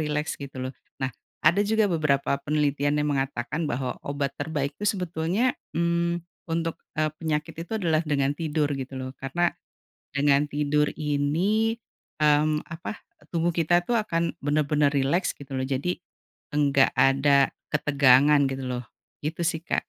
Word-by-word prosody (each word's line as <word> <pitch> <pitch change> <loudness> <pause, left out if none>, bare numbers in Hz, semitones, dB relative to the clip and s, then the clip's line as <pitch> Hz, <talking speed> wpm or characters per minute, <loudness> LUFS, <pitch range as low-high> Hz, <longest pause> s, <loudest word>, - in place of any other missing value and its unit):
rileks 150 0 -1
gitu 140 -1 -8
loh. 130 +1 -4 0.3
Nah, 130 - +1 0.4
ada 170 +6 +5
juga 215 0 +2
beberapa 140 -4 +1
penelitian 145 -1 +1
yang 150 - 0
mengatakan 135 +3 -2
bahwa 125 +1 -2
obat 140 -1 -2
terbaik 145 -1 -2
tuh - - -2
sebetulnya, 185 +4 0 0.2
mmm, 170 0 +1 0.3
untuk, 165 0 -1 0.2
eee, 155 0 +3
penyakit 155 -2 -2
itu 200 - -10
adalah 160 -3 +2
dengan 140 -2 +1
tidur 155 -2 0
gitu 135 0 -6
loh. 130 0 -5
Karena 175 +6 +1 0.7
dengan 140 0 +3
tidur 150 0 +2
ini, 160 +10 +1 0.5
mmm, 150 0 +3
apa, 170 +5 -6 0.3
tubuh 170 +1 +2
kita 175 +1 +3
tuh 240 - +1
akan 170 -5 -1
bener-bener 150 0 +2
rileks 145 +7 +1
gitu 140 -1 -13
loh. 130 - -1
Jadi 140 +7 -1 0.6
enggak 140 -2 +4
ada 135 0 +4 0.2
ketegangan 140 0 +5
gitu 135 0 -4
loh. 125 -1 -3 0.4
Gitu 160 +3 -3
sih, 160 - -1
Kak. - - -1
150 Hz, 145 wpm, -26 LUFS, 140-165 Hz, 0.7 s, ada